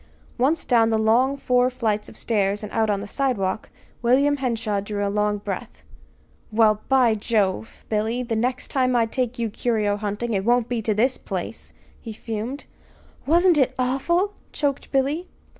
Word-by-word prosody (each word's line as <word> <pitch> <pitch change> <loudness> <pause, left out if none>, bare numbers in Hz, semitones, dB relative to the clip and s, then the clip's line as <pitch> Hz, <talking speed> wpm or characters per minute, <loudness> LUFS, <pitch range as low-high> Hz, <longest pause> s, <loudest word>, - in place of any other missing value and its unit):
Once 290 +6 +2
down 230 -3 +4
the 220 - +2
long 240 +6 +3
four 250 -2 +2
flights 220 -4 -2
of - - -13
stairs 205 -2 0
and 210 - -6
out 220 -1 +1
on 200 -1 0
the - - -5
sidewalk, 215 -5 -1 0.3
William 275 +4 +3
Henshaw 230 -6 -1
drew 205 0 -3
a 200 - -2
long 210 0 +1
breath. 205 - -6 0.7
"Well, 215 -1 +3
by 255 -4 +4
Jove! 210 -1 -1
Billy, 220 +3 -1
the 235 -2 -2
next 250 +3 -1
time 255 -2 +1
I 235 -1 +4
take 250 +1 -2
you 230 -2 -2
curio 210 -3 0
hunting, 210 +3 -3
it 195 -1 0
won't 240 +1 +2
be 240 -2 -2
to 215 -1 0
this 250 +5 +1
place," - - -5 0.3
he 225 - -7
fumed. 225 +5 -5 0.6
"Wasn't 340 +1 +4
it 260 -1 +2
awful!" 340 +10 +1 0.2
choked 280 -3 -2
Billy. 285 +6 0
230 Hz, 170 wpm, -23 LUFS, 215-260 Hz, 0.7 s, down